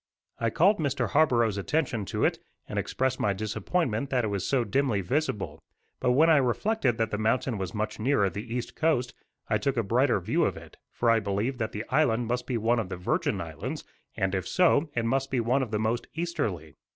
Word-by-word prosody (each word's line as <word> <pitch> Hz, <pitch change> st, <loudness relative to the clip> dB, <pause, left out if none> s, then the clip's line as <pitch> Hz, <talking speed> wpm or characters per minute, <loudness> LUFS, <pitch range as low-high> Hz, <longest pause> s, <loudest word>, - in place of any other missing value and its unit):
I 115 Hz, -, +1 dB
called 190 Hz, -, +3 dB
Mr. 140 Hz, -3 st, 0 dB
Scarborough's 120 Hz, -9 st, +3 dB
attention 125 Hz, -2 st, -1 dB
to -, -, 0 dB
it, -, -, +1 dB, 0.3 s
and -, -, -2 dB
expressed 130 Hz, 0 st, -1 dB
my 100 Hz, -, +1 dB
disappointment 115 Hz, -, -1 dB
that 125 Hz, -3 st, +1 dB
it -, -, -1 dB
was 100 Hz, -2 st, -2 dB
so 135 Hz, -3 st, +2 dB
dimly 130 Hz, -5 st, +1 dB
visible; 110 Hz, -, -2 dB, 0.4 s
but 125 Hz, -, +2 dB
when 155 Hz, +6 st, +5 dB
I 160 Hz, -2 st, +6 dB
reflected 130 Hz, -, +1 dB
that 115 Hz, -1 st, 0 dB
the 105 Hz, -, -2 dB
mountain 115 Hz, +1 st, 0 dB
was 95 Hz, 0 st, -4 dB
much 110 Hz, +1 st, -3 dB
nearer 115 Hz, -3 st, +2 dB
the 105 Hz, +5 st, -6 dB
east 120 Hz, 0 st, -4 dB
coast, 150 Hz, -7 st, +1 dB, 0.3 s
I -, -, +1 dB
took 140 Hz, -2 st, -1 dB
a 115 Hz, -, +2 dB
brighter 120 Hz, +3 st, +2 dB
view 90 Hz, -, 0 dB
of -, -, 0 dB
it, -, -, -12 dB
for 120 Hz, -1 st, +2 dB
I 115 Hz, -, +4 dB
believed 105 Hz, +6 st, -2 dB
that 110 Hz, -1 st, -2 dB
the 105 Hz, +2 st, -5 dB
island 125 Hz, -4 st, +2 dB
must 125 Hz, +1 st, -2 dB
be 125 Hz, -, -1 dB
one 115 Hz, +2 st, +2 dB
of 105 Hz, -5 st, -3 dB
the 95 Hz, -, -5 dB
Virgin 145 Hz, -, 0 dB
Islands; 80 Hz, -3 st, -5 dB, 0.3 s
and, 95 Hz, 0 st, 0 dB
if 95 Hz, -2 st, -2 dB
so, 165 Hz, -4 st, +3 dB
it 120 Hz, -1 st, 0 dB
must 135 Hz, +3 st, 0 dB
be 130 Hz, -, 0 dB
one 120 Hz, +4 st, +2 dB
of 130 Hz, -, -2 dB
the 105 Hz, -, -1 dB
most 110 Hz, +3 st, -1 dB
easterly. 100 Hz, -, -3 dB
120 Hz, 215 wpm, -27 LUFS, 105-135 Hz, 0.4 s, I